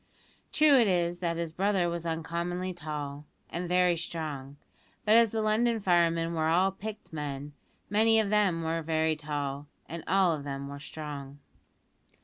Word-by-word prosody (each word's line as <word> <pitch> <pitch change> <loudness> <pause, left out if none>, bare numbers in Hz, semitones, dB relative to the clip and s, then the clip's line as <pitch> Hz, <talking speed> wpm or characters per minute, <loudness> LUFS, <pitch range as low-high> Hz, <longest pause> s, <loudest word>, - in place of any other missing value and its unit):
True 300 -3 +6
it 230 - +4
is 175 -2 +1
that 170 -2 -1
his 170 -2 -3
brother 190 -1 +1
was 170 0 -3
uncommonly 170 +3 -2
tall, 150 -3 -6 0.2
and 175 +1 -3
very 180 -1 +4
strong; 150 -5 -5 0.5
but 210 - +5
as 230 0 +6
the 220 +1 -1
London 225 +2 +2
firemen 170 -3 +2
were 160 -1 0
all 180 +4 +3
picked 215 -1 -8
men, 145 -1 -5 0.3
many 225 +2 +4
of 210 -2 0
them 195 -6 +2
were 165 +1 -1
very 160 0 +1
tall, 145 -1 -4 0.2
and 165 0 -6
all 190 -2 +4
of 150 -3 -4
them 140 -1 -5
were 140 0 -7
strong. 145 -2 -7
170 Hz, 160 wpm, -29 LUFS, 150-190 Hz, 0.5 s, True